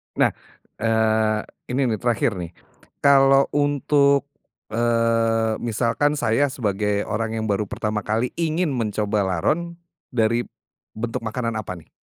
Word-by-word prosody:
Nah, -, -, +3 dB, 0.5 s
eee, 110 Hz, -1 st, +2 dB, 0.3 s
ini 135 Hz, -, +1 dB
nih 110 Hz, -, -2 dB
terakhir 115 Hz, -4 st, 0 dB
nih, 85 Hz, -1 st, -6 dB, 0.5 s
kalau 135 Hz, -1 st, +6 dB
untuk, 145 Hz, -1 st, +2 dB, 0.4 s
eee, 115 Hz, -1 st, +1 dB
misalkan 120 Hz, +6 st, 0 dB
saya 145 Hz, 0 st, +2 dB
sebagai 105 Hz, -5 st, -1 dB
orang 115 Hz, +1 st, -2 dB
yang -, -, -2 dB
baru 100 Hz, 0 st, 0 dB
pertama 105 Hz, +1 st, -2 dB
kali 115 Hz, +4 st, 0 dB
ingin 165 Hz, -1 st, 0 dB
mencoba 105 Hz, -4 st, 0 dB
laron, 165 Hz, -, -1 dB, 0.4 s
dari 115 Hz, +1 st, +1 dB, 0.5 s
bentuk 115 Hz, +1 st, -3 dB
makanan 115 Hz, +1 st, -3 dB
apa 90 Hz, -3 st, -5 dB
nih? 80 Hz, -2 st, -15 dB
115 Hz, 125 wpm, -23 LUFS, 110-135 Hz, 0.5 s, kalau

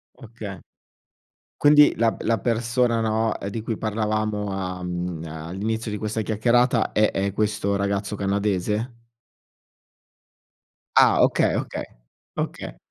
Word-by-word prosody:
Oka 110 Hz, -6 st, -9 dB, 1.0 s
Quindi, 150 Hz, 0 st, +6 dB
la 115 Hz, 0 st, +2 dB
b -, -, -10 dB
la 115 Hz, 0 st, +1 dB
persona, 120 Hz, 0 st, +1 dB
no, 110 Hz, 0 st, 0 dB
ehm, 100 Hz, -, -4 dB
di 110 Hz, +2 st, -4 dB
cui 110 Hz, 0 st, -3 dB
parlavamo 110 Hz, -1 st, -1 dB
a 90 Hz, -1 st, -4 dB
mhmm, 90 Hz, -2 st, -4 dB
all'inizio 95 Hz, +9 st, -4 dB
di 105 Hz, -, -3 dB
questa 110 Hz, +1 st, -2 dB
chiacchierata 120 Hz, +2 st, +2 dB
è 105 Hz, 0 st, +3 dB
è 100 Hz, 0 st, -1 dB
questo 105 Hz, -1 st, 0 dB
ragazzo 100 Hz, +1 st, -1 dB
canadese? 100 Hz, +3 st, -1 dB, 2.0 s
Ah! -, -, +6 dB
Okay, -, -, +3 dB
okay, -, -, -4 dB, 0.5 s
oka -, -, -4 dB
105 Hz, 120 wpm, -24 LUFS, 100-115 Hz, 2.0 s, Quindi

